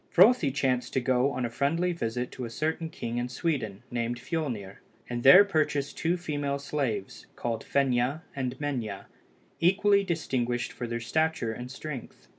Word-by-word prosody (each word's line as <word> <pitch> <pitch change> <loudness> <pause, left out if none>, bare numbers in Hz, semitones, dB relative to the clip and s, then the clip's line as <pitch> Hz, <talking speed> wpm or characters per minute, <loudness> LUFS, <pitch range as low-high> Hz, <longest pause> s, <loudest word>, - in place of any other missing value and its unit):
Frothi 185 - +6
chanced 130 -2 0
to - - +2
go 130 +1 +2
on 125 -1 -2
a - - -2
friendly 165 +8 +1
visit 125 -6 -3
to 130 - -6
a 115 - -4
certain 160 +6 -2
king 120 -6 -4
in 120 +1 -2
Sweden, 125 - -2
named 120 0 -1
Fiolnir, 120 - -4 0.3
and 120 -1 -3
there 180 +11 +9
purchased 150 -6 0
two 170 +2 0
female 145 -4 -2
slaves, 140 -8 -3
called 115 -2 -3
Fenia 135 +2 +1
and 130 -2 -2
Menia, 120 -9 -3 0.5
equally 200 +3 +4
distinguished 125 -9 -1
for 120 - -5
their 115 0 -3
stature 155 0 0
and 125 +2 -7
strength. 135 0 -8
135 Hz, 160 wpm, -28 LUFS, 120-160 Hz, 0.5 s, there